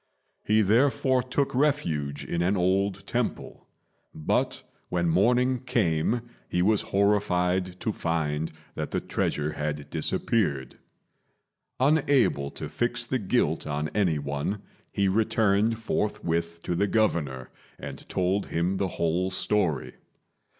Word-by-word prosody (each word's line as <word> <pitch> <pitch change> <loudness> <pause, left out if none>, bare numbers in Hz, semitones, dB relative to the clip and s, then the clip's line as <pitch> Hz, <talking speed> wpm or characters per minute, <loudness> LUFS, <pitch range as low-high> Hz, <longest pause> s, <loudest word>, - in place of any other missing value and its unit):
He 110 +1 +3
therefore 130 +4 +3
took 130 +3 -1
refuge 85 - 0
in 85 - -2
an 95 +3 +2
old 95 +2 +1
temple; - - -3 0.5
but, 75 - 0 0.3
when 85 -1 0
morning 125 +9 +3
came, 110 -2 +1 0.3
he 90 - +1
was 105 +1 +3
horrified 95 -3 +1
to 110 - -1
find 80 -3 -1 0.2
that - - -4
the - - -1
treasure 75 +1 -1
had 75 -1 -4
disappeared. 70 - -1 1.0
Unable 135 - +3
to - - -6
fix 120 0 -2
the 130 - -1
guilt 95 -8 0
on 75 +1 -2
any 90 -5 +1
one, 70 +8 -3 0.3
he 100 -1 +1
returned 110 +1 +2
forthwith 85 -7 -2
to - - -1
the 100 +4 +1
Governor 80 - 0 0.3
and - - -9
told 95 +2 0
him 90 +3 0
the 95 - 0
whole 85 +3 +1
story. 90 -7 0
95 Hz, 120 wpm, -27 LUFS, 80-110 Hz, 1.0 s, He